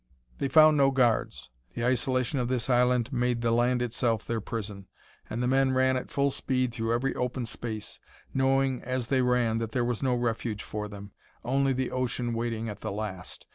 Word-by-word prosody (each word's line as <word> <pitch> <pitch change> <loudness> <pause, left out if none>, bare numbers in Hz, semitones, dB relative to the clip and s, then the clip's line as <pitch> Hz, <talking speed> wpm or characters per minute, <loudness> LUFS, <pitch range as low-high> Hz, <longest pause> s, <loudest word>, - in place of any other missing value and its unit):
They 140 - 0
found 155 +2 +6
no 135 -1 +5
guards; 125 - 0 0.2
the 120 - -1
isolation 130 +1 +1
of 120 - 0
this 125 0 -1
island 125 +1 +2
made 120 -1 0
the 115 -1 +1
land 120 +1 +2
itself 115 -2 0
their 115 -1 -2
prison, 100 -3 -6 0.4
and 120 +3 -2
the - - +1
men 135 0 +3
ran 130 0 +3
at 130 - -3
full 140 0 +1
speed 130 -2 -1
through 115 -1 -2
every 120 +3 0
open 125 0 -2
space, 110 -2 -6 0.3
knowing 135 -1 +2
as 130 -2 -3
they 135 -2 +3
ran 125 -3 +2
that 115 -1 -4
there 125 -2 +1
was 120 -2 -2
no 130 -2 +2
refuge 115 -3 -2
for 105 0 -5
them 100 0 -10 0.3
only 135 +2 +2
the 130 -1 -1
ocean 125 -1 -1
waiting 115 -1 -2
at 105 - -6
the - - -4
last. 100 -3 -6
125 Hz, 195 wpm, -28 LUFS, 115-130 Hz, 0.4 s, found